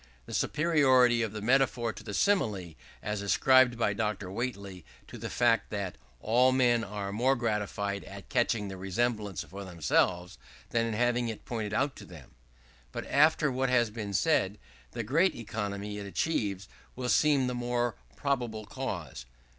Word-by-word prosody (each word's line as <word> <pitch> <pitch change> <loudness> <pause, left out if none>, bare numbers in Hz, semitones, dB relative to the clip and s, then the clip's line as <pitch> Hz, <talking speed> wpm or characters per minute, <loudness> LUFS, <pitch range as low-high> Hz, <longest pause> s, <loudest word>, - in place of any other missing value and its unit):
The - - -9
superiority 130 -7 +3
of 110 -3 -1
the 105 -1 -6
Metaphor 125 -2 +2
to - - -11
the 105 - -5
Simile 105 - +1 0.3
is 105 -1 -2
ascribed 125 +5 +4
by 110 -3 +1
Dr. 100 -3 -2
Whately 100 -5 -5 0.2
to - - -10
the - - -5
fact 115 -3 +2
that 100 -4 -4 0.2
"all 125 - +3
men 120 -3 +3
are 100 -2 -5
more 125 +6 +2
gratified 105 -4 -2
at 100 0 -10
catching 115 -3 +1
the 95 -1 -7
resemblance 100 0 -1
for 100 +2 -9
themselves, 90 -2 0 0.3
than 115 0 +1
in 115 - -2
having 120 +1 +1
it 110 - -7
pointed 110 -3 -3
out 140 +3 0
to - - -10
them." 80 -7 -13 0.6
But - - -5
after 155 0 +3
what 130 +1 0
has 120 -3 +2
been 105 -2 -5
said, 105 - +2 0.4
the 120 - -3
great 165 - +2
economy 105 -2 -4
it 100 - -6
achieves 100 - -1 0.3
will 125 0 -4
seem 140 0 +3
the 125 - -1
more 120 -1 -1 0.2
probable 120 -6 -2
cause. 90 - -6
115 Hz, 160 wpm, -29 LUFS, 100-125 Hz, 0.6 s, ascribed